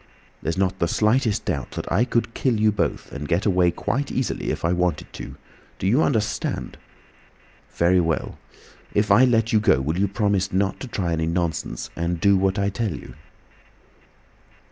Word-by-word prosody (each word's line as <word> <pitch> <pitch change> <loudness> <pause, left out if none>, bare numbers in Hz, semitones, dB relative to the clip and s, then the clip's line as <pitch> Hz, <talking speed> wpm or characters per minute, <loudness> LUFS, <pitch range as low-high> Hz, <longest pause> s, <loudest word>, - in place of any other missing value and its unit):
There's 80 +3 -2
not 95 0 0
the 85 - +2
slightest 110 +3 +1
doubt 80 - -2
that - - -5
I 105 +8 +3
could 115 -2 -1
kill 120 -4 0
you 110 0 +4
both 105 - -2
and 75 +1 -6
get 85 +5 0
away 90 -4 +3
quite 135 +10 -2
easily 130 -1 -2
if - - -2
I 85 - +2
wanted 90 -3 -1
to—do - - -10
you 120 +10 +3
understand? 110 -8 -1 0.9
Very 90 +2 +3
well. 80 -2 -1 0.6
If 105 0 +2
I 115 +6 +7
let 115 -2 +2
you 110 - +5
go 105 - +3
will 75 +6 -2
you 100 - +3
promise 100 -2 0
not 95 +1 0
to 130 - -6
try 90 -7 -2
any 80 0 -1
nonsense 85 -7 -2
and 85 0 -2
do 100 +3 +4
what 95 +1 +1
I 100 0 +1
tell 100 -4 -2
you?" 65 - -10
95 Hz, 175 wpm, -23 LUFS, 85-110 Hz, 0.9 s, I